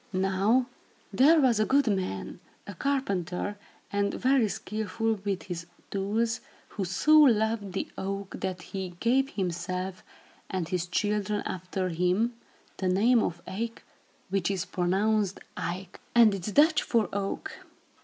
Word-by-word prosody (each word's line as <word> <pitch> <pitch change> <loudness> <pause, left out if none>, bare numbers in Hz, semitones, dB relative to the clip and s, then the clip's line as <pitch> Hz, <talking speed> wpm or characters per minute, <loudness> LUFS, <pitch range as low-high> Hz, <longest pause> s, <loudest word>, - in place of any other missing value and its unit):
Now 195 +6 +2 0.5
there 310 +5 +6
was 250 -6 +4
a 215 - +3
good 280 0 +4
man, 190 - -2 0.3
a 200 - -7
carpenter 205 - -2 0.3
and 200 0 0
very 255 -3 +3
skilful 215 +1 -2
with 200 -2 -2
his 170 -3 -6 0.2
tools, 215 +4 0 0.3
who 195 - -3
so 300 - +5
loved 220 -7 +3
the 195 - -2
oak 195 0 -4
that 185 -2 -3
he 190 -2 -4
gave 265 +3 +2
himself, 185 -1 -3 0.5
and 185 -4 -2
his 180 0 -2
children 205 +2 0
after 185 +1 -3
him, 180 +8 +1 0.4
the 190 - -1
name 220 +6 +4
of 170 -3 -3
Eyck, 230 +5 -4 0.5
which 195 -2 0
is 195 -1 -1
pronounced 195 +2 +1 0.2
Ike, 180 +1 -5 0.2
and 230 -3 +7
is 195 +1 -3
Dutch 300 +5 +5
for 230 -3 +1
oak. 200 0 -3
200 Hz, 135 wpm, -28 LUFS, 185-225 Hz, 0.5 s, and